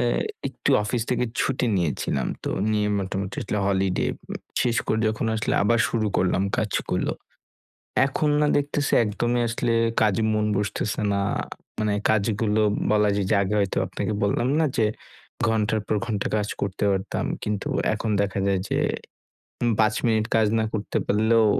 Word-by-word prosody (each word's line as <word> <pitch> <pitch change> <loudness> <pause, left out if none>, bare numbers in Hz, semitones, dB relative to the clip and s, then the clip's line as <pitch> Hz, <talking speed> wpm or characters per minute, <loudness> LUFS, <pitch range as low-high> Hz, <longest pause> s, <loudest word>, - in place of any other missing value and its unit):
এ - - +1 0.5
একটু - - -2
অফিস 115 +3 -1
থেকে 125 0 +1 0.2
ছুটি 130 -2 0
নিয়েছিলাম। 85 -7 -1 0.2
তো - - -1 0.2
নিয়ে 105 -1 +1
মোটামুটি 95 0 -3
আসলে 105 - -2
হলিডে 95 -2 +1 0.2
উ - - -3 0.3
শেষ 120 -2 +1
করে 110 - +1
যখন 110 +1 -2
আসলে 110 - -1
আবার 115 +3 +3
শুরু 110 -2 0
করলাম 95 +1 +2
কাজগুলো, 105 -2 -1 0.9
এখন 150 +2 0
না 150 - +3
দেখতাসি 145 0 -1
একদমই 120 +3 0
আসলে 115 +1 -1 0.3
কাজে 110 +1 +2
মন 105 0 +1
বসতেসে 105 +2 -1
না। 100 - +1 0.6
মানে 105 -1 +1 0.2
কাজগুলো 110 0 +1 0.3
বলা 105 -1 +4
যায় 100 - 0
যে 110 - +4
আগে 100 +1 -1
হয়তো 100 -1 0
আপনাকে 110 - -3
বললাম 120 +5 +1
না 160 - +3
যে 110 - +4 0.6
ঘণ্টার 110 -1 +1
পর 110 - 0
ঘণ্টা 105 -4 -1
কাজ 105 -1 0
করতে 100 0 -2
পারতাম। 95 -1 -2 0.2
কিন্তু 105 -1 -2 0.3
এখন 110 - -3
দেখা 100 0 -1
যায় 95 -1 +2
যে - - +1 0.8
উম 120 - +3
৫ 110 0 +4
মিনিট 110 -1 +2
কাজ 110 -1 +4
না - - +1
করতে 105 -1 -2
পারলেও 110 +2 +3
110 Hz, 160 wpm, -24 LUFS, 100-115 Hz, 0.9 s, বলা